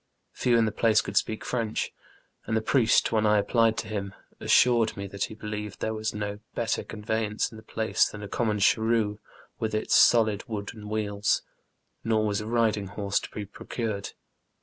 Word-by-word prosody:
Few 120 Hz, -2 st, +2 dB
in 115 Hz, -, +4 dB
tbe 110 Hz, -1 st, -3 dB
place 110 Hz, -2 st, +4 dB
could -, -, -4 dB
speak 110 Hz, -, 0 dB
Frencb, 115 Hz, -3 st, -2 dB, 0.6 s
and 110 Hz, -, +1 dB
tbe 110 Hz, -, -2 dB
priest, 120 Hz, -4 st, +4 dB
wben 110 Hz, -1 st, +2 dB
I 105 Hz, 0 st, +4 dB
applied 110 Hz, +2 st, +2 dB
to 110 Hz, -, -3 dB
bim, 100 Hz, -2 st, -4 dB, 0.2 s
assured 120 Hz, -4 st, +4 dB
me 100 Hz, 0 st, -4 dB
tbat 100 Hz, 0 st, -3 dB
bo 110 Hz, -, -9 dB
believed 105 Hz, -1 st, -6 dB
tbere 110 Hz, -, -1 dB
was 110 Hz, 0 st, -2 dB
no 105 Hz, -1 st, -4 dB, 0.2 s
better 115 Hz, -3 st, -1 dB
conveyance 105 Hz, 0 st, -2 dB
in 110 Hz, -, -10 dB
tbe -, -, -29 dB
place 110 Hz, 0 st, +1 dB
tban 105 Hz, 0 st, -8 dB
a -, -, -5 dB
common 110 Hz, 0 st, 0 dB
cbarrue 110 Hz, 0 st, +2 dB, 0.4 s
witb 110 Hz, -1 st, -1 dB
its 110 Hz, -, -1 dB
solid 110 Hz, -3 st, +5 dB
wooden 105 Hz, -1 st, -6 dB
wbeels; 105 Hz, -1 st, 0 dB, 0.6 s
nor 110 Hz, -1 st, +1 dB
was 105 Hz, -1 st, 0 dB
a 105 Hz, -, -6 dB
riding 110 Hz, -3 st, +1 dB
borse 100 Hz, 0 st, -1 dB
to -, -, -8 dB
be 105 Hz, -, -6 dB
procured. 105 Hz, 0 st, -5 dB
110 Hz, 185 wpm, -27 LUFS, 105-110 Hz, 0.6 s, solid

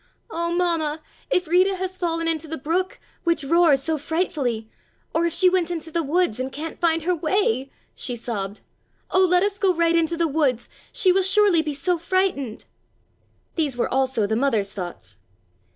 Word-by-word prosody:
"Oh, 340 Hz, -3 st, -1 dB
Mamma, 335 Hz, -3 st, 0 dB, 0.3 s
if 360 Hz, -2 st, +1 dB
Rita 370 Hz, +4 st, +3 dB
has 375 Hz, 0 st, -4 dB
fallen 330 Hz, -2 st, -1 dB
into 320 Hz, -1 st, -1 dB
the 320 Hz, +1 st, -5 dB
brook, 345 Hz, +7 st, -2 dB, 0.2 s
which 335 Hz, -3 st, +1 dB
roars 305 Hz, -2 st, +4 dB
so 315 Hz, +1 st, -1 dB
frightfully, 280 Hz, -8 st, -1 dB, 0.5 s
or 335 Hz, +1 st, +2 dB
if 335 Hz, -, -3 dB
she 350 Hz, +2 st, +4 dB
went 360 Hz, -2 st, +2 dB
into 330 Hz, -2 st, -5 dB
the 335 Hz, -, 0 dB
woods 320 Hz, -5 st, +1 dB
and 260 Hz, +1 st, -3 dB
can't 310 Hz, +4 st, -6 dB
find 330 Hz, -2 st, +2 dB
her 360 Hz, +2 st, +1 dB
way!" 310 Hz, -, 0 dB, 0.2 s
she 245 Hz, -, -3 dB
sobbed. 210 Hz, -4 st, -5 dB, 0.5 s
"Oh, 375 Hz, -, +4 dB
let 360 Hz, 0 st, +4 dB
us 405 Hz, 0 st, -1 dB
go 380 Hz, -3 st, +3 dB
right 335 Hz, 0 st, +2 dB
into 335 Hz, 0 st, +1 dB
the 335 Hz, 0 st, +2 dB
woods. 275 Hz, -6 st, 0 dB, 0.2 s
She 370 Hz, -, +3 dB
will 385 Hz, +1 st, +3 dB
surely 390 Hz, -2 st, +4 dB
be 305 Hz, -2 st, -3 dB
so 335 Hz, +5 st, 0 dB
frightened!" 340 Hz, -, -1 dB, 0.9 s
These 295 Hz, -7 st, -1 dB
were 240 Hz, -, -1 dB
also 260 Hz, -4 st, +1 dB
the 220 Hz, +2 st, 0 dB
mother's 220 Hz, -6 st, 0 dB
thoughts. 175 Hz, -, -8 dB
325 Hz, 180 wpm, -23 LUFS, 270-360 Hz, 0.9 s, roars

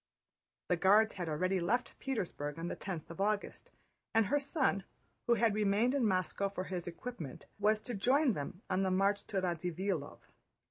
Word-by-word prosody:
The 180 Hz, -, +3 dB
Guards 210 Hz, +5 st, +5 dB
had 175 Hz, -3 st, -4 dB
already 185 Hz, +5 st, +1 dB
left 225 Hz, +9 st, 0 dB
Petersburg 175 Hz, -, -3 dB
on 165 Hz, +1 st, -3 dB
the -, -, -3 dB
tenth 175 Hz, -5 st, -6 dB
of 170 Hz, -, -6 dB
August, 205 Hz, 0 st, -1 dB, 0.5 s
and 225 Hz, -1 st, +5 dB
her 290 Hz, +9 st, +2 dB
son, 270 Hz, -, +1 dB, 0.4 s
who 240 Hz, -, +5 dB
had 225 Hz, -1 st, +3 dB
remained 210 Hz, +4 st, +2 dB
in 265 Hz, -5 st, +2 dB
Moscow 190 Hz, +1 st, 0 dB
for 190 Hz, -1 st, -4 dB
his 180 Hz, -2 st, -4 dB
equipment, 170 Hz, -, -7 dB
was 215 Hz, +1 st, +2 dB
to 245 Hz, -, -4 dB
join 255 Hz, +6 st, +3 dB
them 180 Hz, +5 st, -6 dB
on 185 Hz, 0 st, +1 dB
the 190 Hz, -, +2 dB
march 195 Hz, +2 st, +2 dB
to 195 Hz, -, 0 dB
Radzivílov. 180 Hz, -2 st, -2 dB
195 Hz, 175 wpm, -34 LUFS, 180-220 Hz, 0.5 s, Guards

